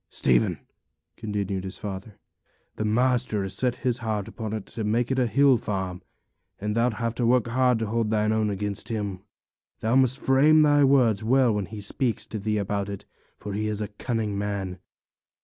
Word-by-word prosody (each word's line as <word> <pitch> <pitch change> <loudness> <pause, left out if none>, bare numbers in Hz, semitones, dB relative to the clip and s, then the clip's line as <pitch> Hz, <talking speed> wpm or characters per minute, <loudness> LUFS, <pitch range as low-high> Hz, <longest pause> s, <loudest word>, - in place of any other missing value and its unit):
'Stephen,' 60 -2 +2 0.6
continued 100 -3 -3
his 95 0 -6
father, 100 +1 -7 0.6
'the 110 - -2
master 120 -1 +1
has 95 -1 -4
set 125 +4 0
his 125 -1 +1
heart 110 -4 -2
upon 110 -2 -6
it 110 -2 -4
to 115 - -6
make 115 +4 0
it 130 - +1
a 125 - +2
hill 140 +1 +4
farm; 95 -4 -4 0.6
and 105 +1 -2
thou'lt 115 +1 +2
have 115 +1 -2
hard - - -12
work 125 0 +3
to 110 - -2
hold 110 0 -1
thy 105 -1 +1
own 110 0 +1
against 100 +1 -3
him. 100 -5 -3 0.6
Thou 115 +3 +1
must 130 0 +4
frame 150 +4 +5
thy 145 -1 +5
words 125 -6 +3
well 125 0 +3
when 105 -2 -2
he 105 0 -8
speaks 115 +2 -1
to 110 - -6
thee 105 +1 -1
about 100 0 -2
it, 100 -1 -7 0.3
for 105 - -6
he's 105 0 -2
a 105 - -3
cunning 110 -1 -3
man. 100 -3 -3
110 Hz, 185 wpm, -25 LUFS, 100-125 Hz, 0.6 s, frame